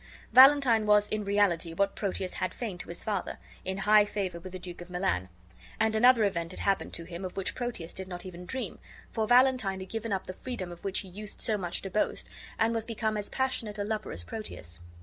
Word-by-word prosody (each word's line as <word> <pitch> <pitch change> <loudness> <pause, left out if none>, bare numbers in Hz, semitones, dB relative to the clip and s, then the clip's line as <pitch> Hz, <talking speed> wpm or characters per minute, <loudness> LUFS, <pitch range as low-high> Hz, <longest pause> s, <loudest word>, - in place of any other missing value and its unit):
Valentine 260 -4 +7
was 210 0 +5
in 215 -1 -1
reality, 195 -5 +1
what 200 +3 +2
Proteus 190 -2 -2
had 185 -1 -2
feigned 210 -7 -4
to - - -6
his 170 - -6
father, 205 -4 -2 0.3
in 190 +1 -3
high 210 +2 +6
favor 195 -4 -3
with 185 +2 -9
the - - -3
Duke 175 -1 -9
of 175 - -10
Milan; 175 - -1 0.5
and 220 0 +2
another 240 0 +6
event 170 -5 0
had - - -5
happened 195 -1 +1
to 170 - -3
him 170 +2 -7
of 185 0 -6
which 195 - -1
Proteus 240 -9 -4
did 190 0 -6
not 180 -1 -6
even 180 -1 -8
dream, 260 +5 -4 0.3
for 220 -2 -1
Valentine 245 -6 +4
had 190 0 -8
given 225 0 -4
up 190 -1 -1
the 185 - -6
freedom 190 -5 -5
of 175 - -11
which 195 -1 0
he 195 - -10
used 205 +3 -8
so 220 - +1
much 180 -4 -2
to 195 - -5
boast, 210 - 0 0.3
and 225 +1 +2
was 225 -1 -1
become 220 -1 -1
as 205 -1 -2
passionate 235 -5 -1
a 205 - -1
lover 215 +1 -3
as 85 - -4
Proteus. 85 - -6
200 Hz, 230 wpm, -29 LUFS, 180-220 Hz, 0.5 s, Valentine